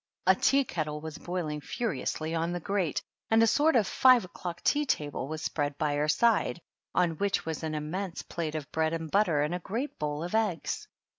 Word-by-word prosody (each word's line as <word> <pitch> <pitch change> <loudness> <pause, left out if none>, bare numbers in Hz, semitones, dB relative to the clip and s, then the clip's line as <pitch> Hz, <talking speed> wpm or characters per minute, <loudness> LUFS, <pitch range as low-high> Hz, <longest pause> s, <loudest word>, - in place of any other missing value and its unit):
A 190 - +7
tea 275 +8 +3
kettle 155 - -3
was 160 +1 -7
boil 175 -2 -3
ing 150 0 -4
furiously 160 - -2
on 165 +1 0
the 175 - -2
grate, 185 -3 -1 0.3
and 225 +1 +5
a - - +7
sort 300 +7 +3
of 225 -4 +4
five 255 0 +5
o' - - -13
clock 175 -1 -6
tea 295 +1 +3
table 145 - -1
was 155 +1 -5
spread 145 -3 -1
by 150 -2 0
her 145 +1 +1
side, 215 +2 +3 0.4
on 170 -3 +2
which 200 -1 0
was 160 -1 -3
an 160 -1 -3
immense 170 +5 -4
plate 160 -2 -4
of 150 -3 -5
bread 160 0 +1
and 165 -2 -4
butter 175 -7 +3
and 150 +3 -1
a 180 - -1
great 230 - -4
bowl 150 +1 -2
of 175 - -5
eggs. 215 -7 0
165 Hz, 215 wpm, -29 LUFS, 155-200 Hz, 0.4 s, A